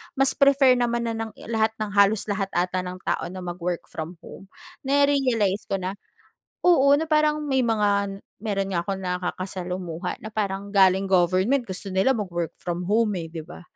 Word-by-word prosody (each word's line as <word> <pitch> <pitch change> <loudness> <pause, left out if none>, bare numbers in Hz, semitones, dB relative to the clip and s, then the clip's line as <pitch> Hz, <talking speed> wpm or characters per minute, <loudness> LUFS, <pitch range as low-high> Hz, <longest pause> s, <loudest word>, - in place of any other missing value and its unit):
mas 270 0 +3
prefer 275 -2 +5
naman 235 -1 0
na - - -2
ng 225 -1 -4 0.2
lahat, 220 0 +1
ng 210 -1 -2
halos 200 +1 +4
lahat 195 -1 0
ata 180 +1 0
ng 180 0 -6
tao - - -1
na 185 0 -7
mag-work 175 0 -4
from 160 +3 -6
home. 195 - -11 0.4
Na-realize 265 -8 +2
ko 195 - 0
na, 185 +2 -3 0.7
oo, 280 -6 +5
na 320 - -1
parang 305 0 +3
may 265 -2 +1
mga 200 -3 +1 0.2
meron 195 -3 -1
nga 170 - +1
akong 195 -1 -2
nakakasalumuha 180 -1 -4
na - - -4
parang 200 -1 -2
galing 190 0 +4
government, 190 +8 +2
gusto 195 +1 -4
nila 195 +8 +3
mag-work 175 -5 -3
from 175 0 -3
home 215 -1 +2
eh, 165 -1 -5
'di 160 -2 -7
ba? - - -11
195 Hz, 175 wpm, -24 LUFS, 180-235 Hz, 0.7 s, prefer